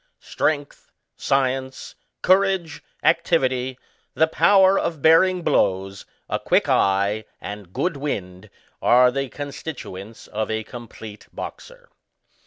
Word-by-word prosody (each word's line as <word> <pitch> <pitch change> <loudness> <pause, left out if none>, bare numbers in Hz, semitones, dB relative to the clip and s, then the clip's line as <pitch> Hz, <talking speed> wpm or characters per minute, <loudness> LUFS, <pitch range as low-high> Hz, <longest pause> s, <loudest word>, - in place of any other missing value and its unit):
Strength, 145 -2 -3 0.2
science^ 130 -1 -1 0.3
courage 190 -3 +2 0.2
y - - +6
activity, 130 -1 -1 0.4
the 160 - +4
power 190 +3 +4
of 160 -3 -2
bearing 175 +4 +4
blows, 95 -4 0 0.2
a - - -2
quick - - +2
eye, 100 +2 +2
and 100 -3 -8
good 175 - -1
wind, 95 -11 -5 0.3
are 125 +1 +5
the 135 0 -3
constituents 125 -8 -8
of 110 +1 -4
a 110 0 -2
complete 110 -2 -11
boxer. - - -9
130 Hz, 110 wpm, -22 LUFS, 105-160 Hz, 0.4 s, y